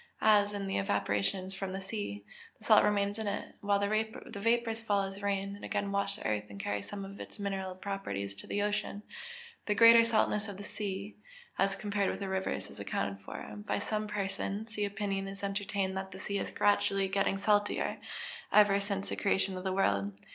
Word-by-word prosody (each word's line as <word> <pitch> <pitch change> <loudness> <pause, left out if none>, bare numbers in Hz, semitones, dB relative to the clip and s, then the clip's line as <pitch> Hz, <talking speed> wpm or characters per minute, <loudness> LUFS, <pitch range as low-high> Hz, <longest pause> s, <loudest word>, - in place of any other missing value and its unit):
As, 205 -1 +6
in 200 -1 -3
the 195 - 0
evaporations 100 - 0
from 190 -1 -4
the 190 - -3
sea, 190 - -5 0.3
the - - -19
salt - - +7
remains 205 0 +1
in 220 - -2
it, 200 - -3
while 205 0 +3
the 215 +2 -1
vapours 230 +1 +1
fall 205 -3 +2
as 195 +1 -5
rain, 200 0 -1
and 205 - -13
again 200 0 -1
wash 200 0 0
the - - -9
earth 105 -1 0
and 100 -1 -9
carry 100 +1 -1
some 200 - -6
of 200 +1 -10
its - - -8
mineral 195 -2 -3
properties 100 - -4
to - - -5
the 205 - 0
ocean, 210 0 -1 0.6
the 210 - +2
greater 230 +1 +9
saltness 220 -2 +2
of 200 -2 -6
the 200 - -7
sea, 200 0 -4 0.4
as 195 0 +3
compared 205 -1 0
with - - -3
rivers, 190 0 -2
is - - -11
accounted 100 0 -2
for. 105 - -7
By 105 0 -2
some 215 - -1
persons 205 +2 -3
the 210 -2 0
opinion 195 -1 -2
is 195 +1 -8
entertained 195 -1 -1
that 190 0 -3
the 185 - -9
sea 200 +1 -2
has - - -2
been - - -11
gradually 195 -1 +3
getting 195 0 +1
salter 205 +1 +1 0.5
ever 205 -1 +6
since 200 -1 -2
the - - -2
creation 195 -1 +1
of 185 - -5
the 190 - 0
world. 100 - +1
200 Hz, 200 wpm, -32 LUFS, 190-205 Hz, 0.6 s, greater